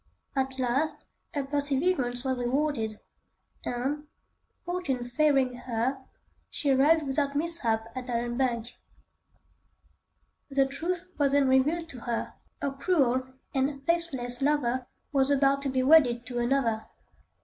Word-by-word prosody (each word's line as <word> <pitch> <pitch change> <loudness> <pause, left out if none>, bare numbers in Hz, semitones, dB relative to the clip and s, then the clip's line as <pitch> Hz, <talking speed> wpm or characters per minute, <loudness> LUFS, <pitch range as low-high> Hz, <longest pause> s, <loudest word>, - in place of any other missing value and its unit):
At 265 -1 -1
last 275 +5 -1 0.3
her 285 - 0
perseverance 275 -2 0
was 260 -1 0
rewarded, 245 -3 -1 0.6
and, 275 +5 -2 0.6
Fortune 345 -9 -2
favouring 270 0 +2
her, 245 +2 -2 0.5
she 285 -3 +1
arrived 295 +4 +4
without 280 +1 0
mishap 285 -9 +3
at 255 0 -5
Allanbank. 240 0 -1 1.8
The 275 -1 +3
truth 345 +6 -3
was 280 -1 +3
then 285 -1 +4
revealed 295 +6 +2
to 255 - -7
her: 235 0 -3 0.3
her 280 - 0
cruel 270 -4 +1 0.3
and 275 0 -1
faithless 270 -8 -1
lover 260 -3 +1 0.2
was 270 -1 +3
about 275 0 +3
to 280 - -1
be 260 -1 +1
wedded 255 -5 +5
to 245 0 -3
another. 240 -3 0
270 Hz, 120 wpm, -28 LUFS, 245-290 Hz, 1.8 s, wedded